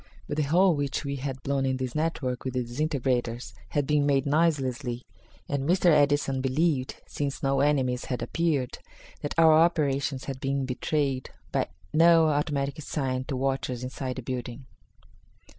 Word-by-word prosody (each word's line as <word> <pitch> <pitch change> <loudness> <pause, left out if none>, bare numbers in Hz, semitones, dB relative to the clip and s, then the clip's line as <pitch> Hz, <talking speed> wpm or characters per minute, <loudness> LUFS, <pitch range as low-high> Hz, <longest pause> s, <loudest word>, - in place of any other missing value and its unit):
But 145 - -4
the - - +2
hole 175 +6 +4
which 145 0 -2
we 140 0 -2
had 130 -1 -5
blown 140 -1 0
in 130 -1 0
this 130 -2 -3
network 150 -5 -2
with 130 -1 -4
the 125 - +1
disintegrators 125 -2 -2 0.2
had 145 -1 0
been 145 0 +2
made 140 -1 +2
noiselessly, 135 -5 0 0.4
and 140 +1 -2
Mr. 180 -1 +4
Edison 145 -2 +3
believed, 135 0 0
since 140 -2 -4
no 135 0 +2
enemies 135 -3 +1
had 125 - -3
appeared, 155 -7 -1 0.4
that 145 - -4
our 160 -1 +7
operations 145 -5 +2
had 135 -2 -4
not - - -20
been 135 0 -1
betrayed 135 0 -1 0.2
by - - 0 0.3
any 165 - +5
automatic 150 -3 +3
signal 130 -3 -2
to 135 - -3
watchers 130 -2 -1
inside 130 0 -4
the 130 - -6
building. 125 +1 -5
140 Hz, 160 wpm, -27 LUFS, 130-150 Hz, 0.4 s, our